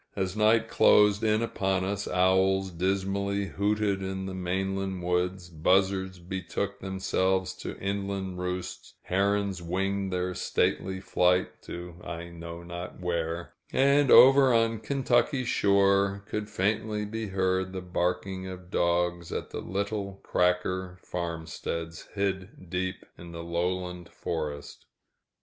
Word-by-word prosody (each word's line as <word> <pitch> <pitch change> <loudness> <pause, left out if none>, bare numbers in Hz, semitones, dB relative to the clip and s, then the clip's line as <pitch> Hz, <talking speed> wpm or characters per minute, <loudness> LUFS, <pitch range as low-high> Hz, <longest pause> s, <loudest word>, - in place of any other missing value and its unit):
As 95 -1 -2
night 110 +1 +4
closed 105 -1 +5
in 110 +1 +3
upon 95 -4 0
us, 100 +1 -2
owls 95 +1 +3
dismally 100 +3 0
hooted 100 0 0
in 95 0 -3
the 95 - -5
mainland 95 +1 -2
woods, 90 +1 0
buzzards 95 +3 +1
betook 95 +2 -4
themselves 95 -1 0
to - - -6
inland 100 -2 -3
roosts, 90 0 -5
herons 100 0 0
winged 95 +3 -1
their 90 0 -1
stately 95 +1 0
flight 90 -1 +1
to 90 0 -8
I 85 0 -6
know 85 0 -8
not 85 +1 -7
where, 85 -1 -2 0.2
and 140 +1 +4
over 135 0 +8
on 115 -1 +2
the 110 - -17
Kentucky 135 0 +2
shore 100 -2 +3
could 105 0 -3
faintly 105 +2 0
be 110 +1 -4
heard 95 -1 0
the 95 -1 -5
barking 90 +1 -2
of 90 -1 -9
dogs 85 -1 +1
at - - -4
the - - -4
little 100 0 -3
"cracker" 90 0 0
farmsteads 85 -1 -5
hid 95 -3 -3
deep 90 0 -2
in 85 0 -10
the 85 0 -6
lowland 90 +1 -2
forest. 75 -3 -5
95 Hz, 125 wpm, -28 LUFS, 90-100 Hz, 0.2 s, over